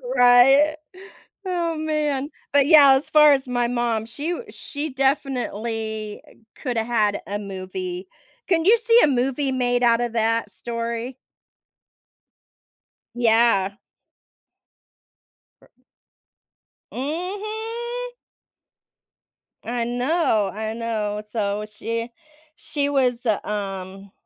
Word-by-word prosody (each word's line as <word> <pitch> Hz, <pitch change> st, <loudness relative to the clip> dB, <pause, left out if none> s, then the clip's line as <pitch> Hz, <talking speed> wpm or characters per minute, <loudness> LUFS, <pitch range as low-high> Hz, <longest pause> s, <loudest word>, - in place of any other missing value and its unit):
Right? 270 Hz, +5 st, +6 dB, 0.7 s
Oh, 345 Hz, -3 st, -1 dB
man. 300 Hz, -3 st, -1 dB, 0.2 s
But, 285 Hz, -1 st, +4 dB
yeah, 290 Hz, -3 st, +8 dB
as 265 Hz, +2 st, 0 dB
far 300 Hz, -1 st, +7 dB
as 270 Hz, -1 st, -1 dB
my 245 Hz, -1 st, 0 dB
mom, 235 Hz, -2 st, -1 dB
she 285 Hz, +8 st, -5 dB
w 465 Hz, +7 st, -5 dB
she 295 Hz, +2 st, -6 dB
definitely 230 Hz, -5 st, -2 dB, 0.3 s
coulda 240 Hz, -4 st, -2 dB
had 215 Hz, -3 st, 0 dB
a 205 Hz, +1 st, -3 dB
movie. 185 Hz, -2 st, -6 dB, 0.4 s
Can 335 Hz, -3 st, +1 dB
you 445 Hz, +5 st, +6 dB
see 465 Hz, +1 st, +4 dB
a -, -, +6 dB
movie 270 Hz, +1 st, 0 dB
made 245 Hz, -1 st, 0 dB
out 235 Hz, 0 st, +4 dB
of 240 Hz, -1 st, -2 dB
that 225 Hz, -1 st, 0 dB
story? 235 Hz, +4 st, -5 dB, 2.0 s
Yeah. 225 Hz, -4 st, +3 dB, 1.9 s
Ri -, -, -22 dB, 1.2 s
Mhm. 435 Hz, -, -4 dB, 1.5 s
I 240 Hz, +1 st, -2 dB
know, 245 Hz, -, +1 dB
I 220 Hz, +1 st, -4 dB
know. 215 Hz, -2 st, -3 dB
So 210 Hz, -1 st, -2 dB
she 230 Hz, +2 st, -5 dB, 0.4 s
she 295 Hz, -3 st, -2 dB
was, 255 Hz, -3 st, +1 dB
uh, 215 Hz, -3 st, +2 dB
um 195 Hz, -1 st, -5 dB
245 Hz, 100 wpm, -23 LUFS, 220-290 Hz, 2.0 s, yeah